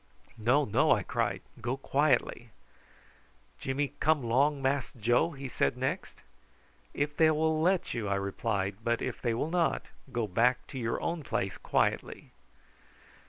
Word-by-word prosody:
"No, 125 +7 +3
no," 105 - +2
I - - +4
cried, - - -1 0.2
"go 125 +4 -2
quietly." 135 -4 +1 1.1
"Jimmy 135 +2 -2
come 155 -3 +2
'long 140 +5 +2
Mass 135 0 0
Joe?" 120 +8 +3
he 140 -1 -6
said 125 - 0
next. 130 +9 -3 0.7
"If 145 0 -2
they 160 0 +5
will 155 0 +1
let 180 +2 +1
you," 115 -4 -3
I 100 - +1
replied; 100 0 -2
"but 120 0 0
if 130 - -4
they 120 -2 0
will 150 +7 -2
not, 175 -2 0 0.2
go 120 -3 0
back 120 +6 +2
to 130 - -6
your 115 -1 -1
own 170 -1 -1
place 95 -8 -2
quietly." - - -1
130 Hz, 150 wpm, -30 LUFS, 115-150 Hz, 1.1 s, they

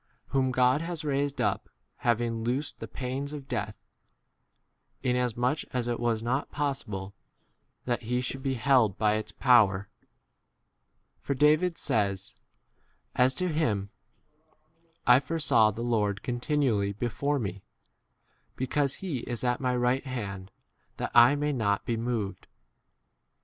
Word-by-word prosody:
Whom 135 -1 +1
God 130 +3 +3
has 165 -2 -4
raised 140 0 -1
up, - - 0 0.3
having 115 -1 0
loosed 130 +5 -2
the - - -6
pains 135 +3 -4
of 140 -3 -7
death, 105 -3 -3 1.3
inasmuch 125 +2 +1
as 125 -2 -1
it 120 -1 -1
was 115 -2 0
not 130 +4 -1
possible 105 -10 -3 0.7
that 120 -1 -1
he 125 +2 -1
should 130 +1 -3
be 135 -1 -1
25 115 - -8
held 125 -8 +4
by 105 -1 +3
its 110 - -5
power; 105 -6 +4 1.3
for 140 - -2
David 155 +5 +3
says 100 -3 -1 0.8
as 130 +1 +3
to 185 +4 0
him, 110 -11 0 1.1
I 125 +1 +7
foresaw 140 -6 +3
the 110 +3 -5
Lord 105 -4 0
continually 120 -5 0
before 125 +7 -1
me, 100 -6 -4 0.9
because 135 +2 0
he 150 -9 -2
is 120 0 -4
at 125 +1 0
my 125 -1 +1
right 125 +3 +1
hand 100 -7 -5 0.5
that - - -3
I 120 +4 +7
may 145 +1 -1
20 140 - -2
not 100 -2 0
be 115 - 0
moved. 115 -3 -3
125 Hz, 135 wpm, -28 LUFS, 110-140 Hz, 1.3 s, I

